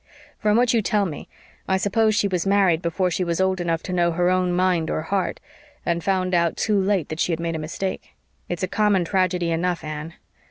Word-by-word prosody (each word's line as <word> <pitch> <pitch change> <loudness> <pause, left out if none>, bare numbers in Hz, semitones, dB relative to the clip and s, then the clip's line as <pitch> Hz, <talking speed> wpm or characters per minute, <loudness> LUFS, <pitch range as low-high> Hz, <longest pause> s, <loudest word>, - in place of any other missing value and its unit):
"From 210 0 +2
what 245 0 +3
you 230 - +3
tell 210 -1 +1
me 155 -6 -7 0.4
I 190 - +2
suppose 215 +3 +2
she 205 - +2
was 185 -1 -1
married 195 -4 +3
before 180 +2 0
she 185 - 0
was 170 -1 -1
old 190 -1 +1
enough 165 -1 -1
to 185 - -4
know 175 -1 +2
her 175 +2 +2
own 185 -1 +1
mind 175 -2 +1
or 155 - -2
heart, 190 +3 -1 0.5
and 170 -1 -1
found 185 -1 0
out 170 -1 +2
too 210 -3 +1
late 190 -5 0
that 155 - -5
she 180 - +1
had 165 - -1
made 165 -1 -2
a - - -3
mistake. 180 +5 -5 0.3
It's 175 +1 -3
a - - +1
common 205 -2 +2
tragedy 180 -2 0
enough, 175 +1 -1
Anne. 155 +2 -6
180 Hz, 225 wpm, -23 LUFS, 170-195 Hz, 0.5 s, what